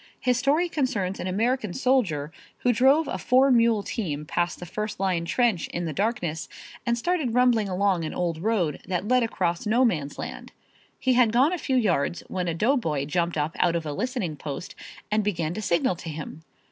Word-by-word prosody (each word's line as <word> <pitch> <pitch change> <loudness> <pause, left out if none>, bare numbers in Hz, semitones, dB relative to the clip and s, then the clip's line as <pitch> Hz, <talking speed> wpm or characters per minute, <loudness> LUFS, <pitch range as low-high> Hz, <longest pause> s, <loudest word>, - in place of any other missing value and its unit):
His 250 -1 +1
story 290 +7 +2
concerns 215 - -1
an - - -3
American 220 +1 0
soldier 200 - +1 0.3
who 245 - +3
drove 270 +7 +4
a - - -3
four 265 +2 +4
mule 230 -3 +4
team 150 -11 -3
past 175 +3 -1
the 180 - -7
first 210 +4 -4
line 185 -3 0
trench 220 0 +1
in 175 0 -4
the 160 - -3
darkness 175 - -2 0.4
and 235 0 +2
started 295 -4 -1
rumbling 240 -5 +3
along 185 -2 +1
an 155 - -3
old 170 -3 -1
road 185 -5 0
that 185 +1 -2
led 250 +1 +4
across 185 -5 -1
no 240 +4 +4
man's 150 - -1
land. - - -7 0.5
He 260 - +2
had 245 -3 +4
gone 265 +9 +3
a 360 - -2
few 265 - -1
yards 175 - +1
when 180 -2 -2
a 165 - -1
doughboy 165 - +1
jumped 170 +2 -1
up 150 +2 -1
out 170 -1 +3
of 165 -1 -2
a 150 - -3
listening 200 - -3
post 145 +4 -6 0.4
and 215 0 +2
began 170 -6 -1
to 215 - -4
signal 180 -1 +1
to 165 - -7
him. 155 0 -7
200 Hz, 195 wpm, -25 LUFS, 170-245 Hz, 0.5 s, drove